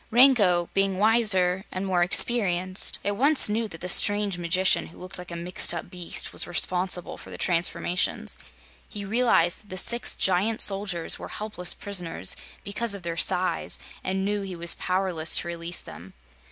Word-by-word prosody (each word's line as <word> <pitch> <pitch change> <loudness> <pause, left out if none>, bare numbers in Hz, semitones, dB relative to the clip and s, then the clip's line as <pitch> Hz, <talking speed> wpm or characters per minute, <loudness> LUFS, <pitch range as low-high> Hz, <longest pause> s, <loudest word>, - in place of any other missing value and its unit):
And 230 - -5
Rango, 205 -10 +5
being 195 -1 0
wiser 195 -4 +3
and 185 +1 -4
more 185 -2 0
experienced, 185 -1 +2
at 205 0 -1
once 280 +6 +4
knew 220 +2 -1
that 165 -5 -11
the 180 - -4
strange 205 +1 +3
magician 175 +2 +1
who - - -16
looked 185 +1 -7
like 180 - -10
a 170 - -7
mixed 175 0 +1
up 170 +1 -7
beast 180 -2 -3
was - - 0
responsible 180 0 -1
for - - -13
the - - -8
transformations. 175 +1 -2 0.5
He 205 -2 -7
realized 200 -6 +2
that 205 - -24
the 185 - -6
six 235 +5 +2
giant 195 +4 +1
soldiers 195 -4 0
were - - -8
helpless 210 -4 -4
prisoners, 180 - -2 0.3
because 205 +1 -1
of 195 - -10
their 170 -1 -4
size, 185 +1 0 0.3
and 190 +1 -2
knew 205 0 -1
he 190 -2 -6
was 170 0 +2
powerless 180 -3 -1
to - - -2
release 170 0 -1
them. 90 +4 -12
185 Hz, 175 wpm, -25 LUFS, 175-205 Hz, 0.5 s, Rango